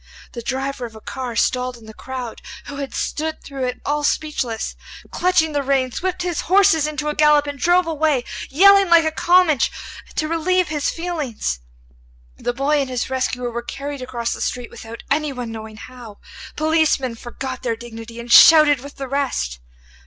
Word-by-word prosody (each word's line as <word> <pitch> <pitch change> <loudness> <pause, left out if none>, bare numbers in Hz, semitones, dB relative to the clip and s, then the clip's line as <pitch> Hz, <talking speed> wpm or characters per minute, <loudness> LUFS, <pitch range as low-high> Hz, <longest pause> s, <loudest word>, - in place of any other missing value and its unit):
The 235 - -7
driver 265 0 -3
of 225 - -16
a - - -10
car 250 +1 -6
stalled 250 +1 0
in 225 - -16
the 220 - -11
crowd, 255 -1 -7 0.2
who 285 - -8
had 280 -1 -5
stood 315 +1 -3
through 270 -2 -4
it 250 0 -3
all 295 +1 0
speechless, 275 -7 -1 0.4
clutching 345 -3 +2
the 290 -1 0
reins, 265 -2 0
whipped 365 -1 -2
his 350 -3 -2
horses 375 -6 +5
into 300 0 -3
a 300 - 0
gallop 300 -1 +4
and 285 -1 -6
drove 350 +4 +3
away, 310 -5 +1 0.3
yelling 395 +5 +6
like 335 -1 +6
a 315 - +1
Comanche, 345 -3 +3 0.4
to 310 - 0
relieve 340 +2 +1
his 295 -2 -1
feelings. 305 - -3 0.8
The - - -2
boy 280 +4 +1
and 270 - -3
his 255 0 -3
rescuer 250 -2 -1
were 235 +1 -4
carried 280 +3 -6
across 235 -2 -3
the - - -7
street 245 -1 -3
without 225 +1 -10
anyone 275 -5 -1
knowing 220 -1 -8
how. 235 -3 -11 0.4
Policemen 310 -5 +1
forgot 255 +2 -7
their 235 -2 -1
dignity 230 0 -10
and 235 0 -7
shouted 305 -2 +8
with 285 +3 -11
the 270 - -6
rest. 260 - -2
275 Hz, 175 wpm, -20 LUFS, 245-310 Hz, 0.8 s, shouted